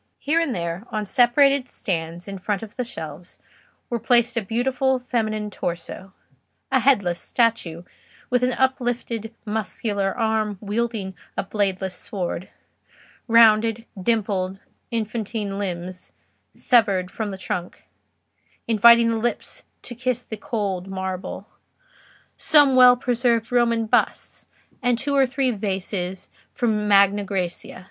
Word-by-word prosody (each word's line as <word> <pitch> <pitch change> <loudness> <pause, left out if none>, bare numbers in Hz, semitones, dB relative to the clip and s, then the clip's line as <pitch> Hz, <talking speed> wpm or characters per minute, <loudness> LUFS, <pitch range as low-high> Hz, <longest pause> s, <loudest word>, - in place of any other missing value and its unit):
Here 310 +4 +1
and 305 -7 -1
there, 170 +3 -4
on 215 -1 -2
separate 265 +4 +3
stands 170 -1 -4
in 195 -1 -6
front 205 +2 -2
of 215 - -10
the 250 - -2
shelves, 165 -6 -8 0.5
were 235 - -2
placed 240 +1 +3
a 230 - +1
beautiful 255 +5 0
feminine 215 -4 -2
torso; 175 +2 -5 0.6
a 265 - +4
headless 200 -10 +2
statue, 220 -9 0 0.5
with 250 0 +3
an 250 0 +1
uplifted 240 -4 -1
muscular 210 -1 -2
arm 220 -3 0
wielding 210 -2 -2 0.2
a - - 0
bladeless 195 -2 -1
sword; 180 -1 -4 0.8
rounded, 225 0 +5 0.2
dimpled, 195 -3 0 0.3
infantine 215 -3 -3
limbs 180 -1 -5 0.4
severed 200 -7 +2
from 220 -2 -3
the 195 - -6
trunk, 180 -1 -5 0.8
inviting 235 +1 +6
the 225 - -1
lips 240 +2 -3 0.2
to 245 - -6
kiss 250 0 -2
the 220 - -7
cold 205 -8 -3
marble; 190 -1 -5 0.9
some 290 -3 +5
well 250 -1 +8
preserved 240 -2 0
Roman 235 -2 +2
busts; 215 - -1 0.3
and 245 -1 +2
two 280 +3 -1
or 270 -1 +4
three 265 0 0
vases 190 -3 -4 0.2
from 215 -3 0
Magna 200 0 +5
Grecia. 185 -4 -4
220 Hz, 125 wpm, -23 LUFS, 195-240 Hz, 0.9 s, well